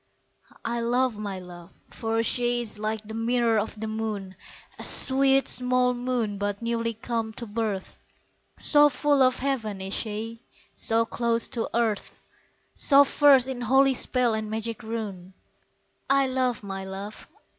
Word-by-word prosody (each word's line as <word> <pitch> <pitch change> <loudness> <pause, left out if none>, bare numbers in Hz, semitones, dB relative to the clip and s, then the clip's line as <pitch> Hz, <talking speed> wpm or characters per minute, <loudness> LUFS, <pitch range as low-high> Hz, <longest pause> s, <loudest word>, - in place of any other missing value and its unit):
I 235 +1 -1
love 240 -1 0
my 200 -2 -4
love 175 -2 -11 0.2
for 225 0 -1
she 240 0 0
is 215 -2 -6
like 215 0 -3
the 220 - -7
mirror 230 0 +1
of 215 0 -5
the 220 - -3
moon, 215 -3 -4 0.5
(A - - -7
sweet, 270 0 +4
small 250 0 +1
moon 240 -5 -2
but 205 0 -2
newly 230 -1 -2
come 225 0 -3
to 235 - -6
birth) 210 -3 -4 0.6
So 295 -1 +5
full 290 0 +1
of 255 -1 +4
heaven 235 -7 -2
is 190 +1 -5
she, 225 +1 -4 0.3
so 230 0 +3
close 235 0 0
to 230 - -3
earth, 225 -3 -1 0.5
So 280 -1 +6
versed 275 -2 +5
in 260 -2 -5
holy 265 +3 +4
spell 250 -2 +2
and 220 -1 -3
magic 225 +1 -4
rune. 205 -5 -6 0.7
I 275 0 +4
love 255 -3 -1
my 195 -1 -5
love. 195 +2 -8
230 Hz, 150 wpm, -26 LUFS, 215-250 Hz, 0.7 s, So